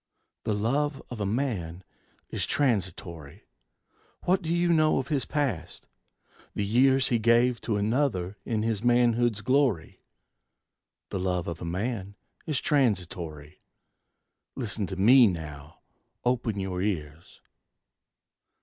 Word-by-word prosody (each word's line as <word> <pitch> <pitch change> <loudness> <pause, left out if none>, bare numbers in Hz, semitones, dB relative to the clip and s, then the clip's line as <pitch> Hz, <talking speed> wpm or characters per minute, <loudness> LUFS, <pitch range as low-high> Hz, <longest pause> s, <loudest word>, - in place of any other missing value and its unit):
The 105 - 0
love 135 +7 0
of 115 -4 -5
a 100 - 0
man 95 -8 -2 0.5
is - - -2
transitory. 90 - -2 0.8
What 185 +2 +2
do 165 - -3
you 175 0 +2
know 155 -1 +3
of 135 - -2
his 140 -4 0
past? 145 -5 -3 0.7
the 105 - -1
years 130 +5 +3
He 120 - +2
gave 120 +2 +3
to 110 -3 -1
another 105 -4 0
his 110 -1 -1
manhood's 120 -2 +3
glory? 130 - +1 1.1
The 95 - -3
love 90 -1 -1
of 85 -1 -5
a - - -4
man 100 +3 -3 0.3
is 150 -5 0
transitory. 90 - -1 0.9
Listen 105 -5 -1
to 95 - -5
me 120 +6 +7
now: 75 -5 -6 0.4
open 120 -4 0
your 95 -1 -3
ears. 80 -5 -4
110 Hz, 120 wpm, -27 LUFS, 90-130 Hz, 1.1 s, me